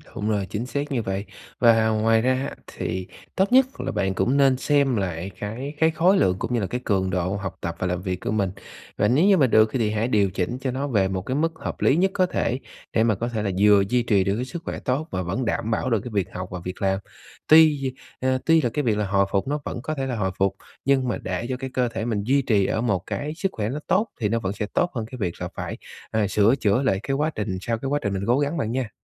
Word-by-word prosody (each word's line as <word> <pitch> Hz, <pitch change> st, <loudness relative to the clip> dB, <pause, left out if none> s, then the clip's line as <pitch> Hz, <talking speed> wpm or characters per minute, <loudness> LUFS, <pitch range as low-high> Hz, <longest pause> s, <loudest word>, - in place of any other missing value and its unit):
Đúng 105 Hz, -, -2 dB
rồi, 100 Hz, -3 st, 0 dB
chính 110 Hz, +4 st, -3 dB
xác 140 Hz, +3 st, -3 dB
như 125 Hz, -4 st, 0 dB
vậy. 95 Hz, -1 st, -3 dB, 0.3 s
Và 115 Hz, -2 st, +5 dB
ngoài 110 Hz, +1 st, +3 dB
ra 130 Hz, +2 st, +2 dB
á 135 Hz, +2 st, -3 dB
thì 95 Hz, 0 st, -4 dB, 0.3 s
tốt 195 Hz, +3 st, +2 dB
nhất 260 Hz, +1 st, +7 dB, 0.2 s
là -, -, -2 dB
bạn 95 Hz, -1 st, 0 dB
cũng 105 Hz, +9 st, +1 dB
nên 135 Hz, -2 st, +4 dB
xem 140 Hz, -2 st, +2 dB
lại 95 Hz, -2 st, -3 dB
cái 125 Hz, +8 st, -5 dB
cái 160 Hz, 0 st, +4 dB
khối 175 Hz, +5 st, +3 dB
lượng 90 Hz, -, +3 dB
cũng -, -, -3 dB
như 120 Hz, -, +2 dB
là 100 Hz, -, -1 dB
cái 125 Hz, +4 st, -3 dB
cường 95 Hz, -3 st, +1 dB
độ 90 Hz, +1 st, -1 dB
học 95 Hz, -2 st, -5 dB
tập 85 Hz, 0 st, -3 dB
và 95 Hz, -, -1 dB
làm 90 Hz, 0 st, -2 dB
việc 90 Hz, -1 st, -3 dB
của -, -, -2 dB
mình. 100 Hz, -4 st, 0 dB, 0.5 s
Và 105 Hz, -, +3 dB
nếu 140 Hz, -, +4 dB
như 195 Hz, -2 st, +6 dB
mà 135 Hz, -4 st, +4 dB
được 110 Hz, -1 st, +5 dB
thì 115 Hz, -5 st, +1 dB
hãy 110 Hz, +2 st, 0 dB
điều 105 Hz, -5 st, +2 dB
chỉnh 95 Hz, +7 st, -2 dB
cho 130 Hz, -1 st, -1 dB
nó 140 Hz, +3 st, -2 dB
về 100 Hz, -7 st, +2 dB
một 95 Hz, -1 st, -2 dB
cái 130 Hz, +7 st, -3 dB
mức 165 Hz, +2 st, +1 dB
hợp -, -, -5 dB
lý 135 Hz, -, +4 dB
nhất 190 Hz, +3 st, +2 dB
có 185 Hz, -, +3 dB
thể, 130 Hz, -7 st, -1 dB, 0.3 s
để 110 Hz, -, +3 dB
mà 115 Hz, -2 st, +3 dB
có 115 Hz, +5 st, -3 dB
thể 110 Hz, -3 st, -2 dB
là 100 Hz, -, 0 dB
vừa 105 Hz, -1 st, +6 dB
duy 125 Hz, +1 st, +2 dB
trì 105 Hz, -5 st, +3 dB
được 100 Hz, +1 st, 0 dB
cái 125 Hz, +3 st, -2 dB
sức 170 Hz, +5 st, -7 dB
khỏe -, -, -4 dB
tốt 140 Hz, +6 st, -1 dB
và 95 Hz, -, -1 dB
vẫn 95 Hz, +9 st, -2 dB
đảm 110 Hz, 0 st, -1 dB
bảo 120 Hz, -, 0 dB
được 115 Hz, -4 st, +2 dB
cái 125 Hz, -, -7 dB
việc 100 Hz, -4 st, 0 dB
học 90 Hz, 0 st, -5 dB
và 90 Hz, -, -4 dB
việc 90 Hz, +1 st, -6 dB
làm. 95 Hz, 0 st, +1 dB, 0.5 s
Tuy, 150 Hz, -4 st, +5 dB, 0.3 s
à, 130 Hz, 0 st, +1 dB
tuy 165 Hz, -1 st, +5 dB
là 120 Hz, -, +1 dB
cái 150 Hz, -, 0 dB
việc 110 Hz, -3 st, +1 dB
là 105 Hz, -, 0 dB
hồi 100 Hz, 0 st, +2 dB
phục 100 Hz, +6 st, 0 dB
nó 145 Hz, +1 st, -1 dB
vẫn 120 Hz, -, -4 dB
có 155 Hz, +5 st, -3 dB
thể 135 Hz, -, -2 dB
là 130 Hz, -2 st, -2 dB
hồi 95 Hz, -4 st, -1 dB
phục, 95 Hz, 0 st, +1 dB, 0.3 s
nhưng 135 Hz, -2 st, +3 dB
mà 120 Hz, -, -1 dB
để 95 Hz, +5 st, -4 dB
cho 125 Hz, -, -2 dB
cái 130 Hz, 0 st, -5 dB
cơ 125 Hz, -1 st, +1 dB
thể 115 Hz, -1 st, -4 dB
mình 105 Hz, -4 st, -1 dB
duy 140 Hz, +5 st, +3 dB
trì 105 Hz, -6 st, +2 dB
ở 110 Hz, -, 0 dB
một 100 Hz, -7 st, 0 dB
cái 150 Hz, +2 st, -3 dB
sức 190 Hz, +3 st, -1 dB
khỏe 105 Hz, -1 st, -3 dB
nó 140 Hz, +5 st, -3 dB
tốt, 210 Hz, +4 st, +2 dB
thì 105 Hz, -4 st, 0 dB
nó 115 Hz, +2 st, +1 dB
vẫn 95 Hz, -3 st, -2 dB
sẽ 105 Hz, -, -3 dB
tốt 175 Hz, -, +1 dB
hơn 115 Hz, -, -2 dB
cái 130 Hz, -, -6 dB
việc 90 Hz, -5 st, -3 dB
là -, -, -2 dB
phải, -, -, -5 dB, 0.3 s
à, 110 Hz, -2 st, +1 dB
sửa 105 Hz, +5 st, +4 dB
chữa 110 Hz, -2 st, +2 dB
lại 95 Hz, -7 st, +2 dB
cái 135 Hz, -, -1 dB
quá 150 Hz, +3 st, +1 dB
trình 105 Hz, -3 st, -2 dB
sau 115 Hz, +1 st, -1 dB
cái 135 Hz, +4 st, -4 dB
quá 145 Hz, +1 st, +1 dB
trình 100 Hz, -, -1 dB
mình 95 Hz, 0 st, -2 dB
cố 125 Hz, +3 st, +3 dB
gắng 145 Hz, +4 st, 0 dB
bạn 110 Hz, -5 st, -1 dB
nha. 125 Hz, -3 st, -2 dB
115 Hz, 285 wpm, -24 LUFS, 100-135 Hz, 0.5 s, nhất